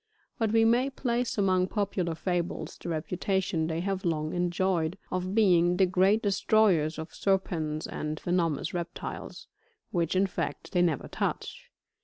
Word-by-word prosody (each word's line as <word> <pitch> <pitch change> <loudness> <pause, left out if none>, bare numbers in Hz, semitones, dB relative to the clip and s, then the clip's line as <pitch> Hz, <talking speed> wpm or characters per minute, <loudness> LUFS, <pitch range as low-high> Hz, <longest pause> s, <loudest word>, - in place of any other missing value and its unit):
But 225 -2 +1
we 225 0 +4
may 240 +4 +3
place 245 -3 -1
among 185 -2 +3
popular 190 -5 -1
fables, 175 0 -2
the - - -7
reputation 175 +1 -1
they 165 0 -2
have 195 0 -2
long 155 -3 -1
enjoyed, 175 -1 0
of 185 +2 -2
being 180 -5 +4
the 190 - +5
great 190 +4 +3
destroyers 195 -5 +3
of 160 0 -7
serpents 165 -6 -1
and 155 0 -4
venomous 170 -4 0
reptiles, 175 -1 -6 0.5
which 170 -1 0
in 190 +1 +4
fact, 190 - -4
they 180 - +2
never 165 -6 +1
touch. - - -4
180 Hz, 145 wpm, -28 LUFS, 165-195 Hz, 0.5 s, the